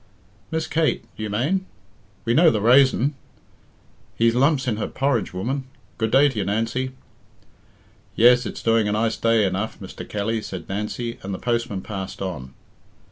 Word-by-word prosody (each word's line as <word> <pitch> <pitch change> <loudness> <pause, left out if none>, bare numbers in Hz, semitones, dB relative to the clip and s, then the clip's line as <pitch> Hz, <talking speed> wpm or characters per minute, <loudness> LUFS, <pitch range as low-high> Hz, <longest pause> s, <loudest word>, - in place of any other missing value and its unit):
"Miss 160 0 -1
Kate, 160 -1 0
you 110 -1 -4
mane? 155 - 0 0.6
We 115 - +2
know 165 +6 +6
the 110 - +1
raison. 130 +4 +4 1.0
He's 115 0 +3
lumps 135 +2 +2
in 110 -4 0
her 110 - -2
porridge, 135 -5 0
woman. 130 +9 -3 0.3
Good 110 -1 +1
day 135 +5 +5
to 130 -6 -3
you, - - +1
Nancy." 115 +6 -1 1.2
"Yes, 125 +2 +5
it's - - -7
doing 115 -2 +3
a 105 - 0
nice 110 +1 +1
day 115 -2 +3
enough, 100 +3 -2
Mr. 95 - -9
Kelly," 110 +2 -1
said 90 -5 -7
Nancy, 105 +4 -4
and 95 0 -4
the - - -5
postman 115 -4 -1
passed 95 -2 -6
on. 75 -9 -5
115 Hz, 160 wpm, -23 LUFS, 105-130 Hz, 1.2 s, know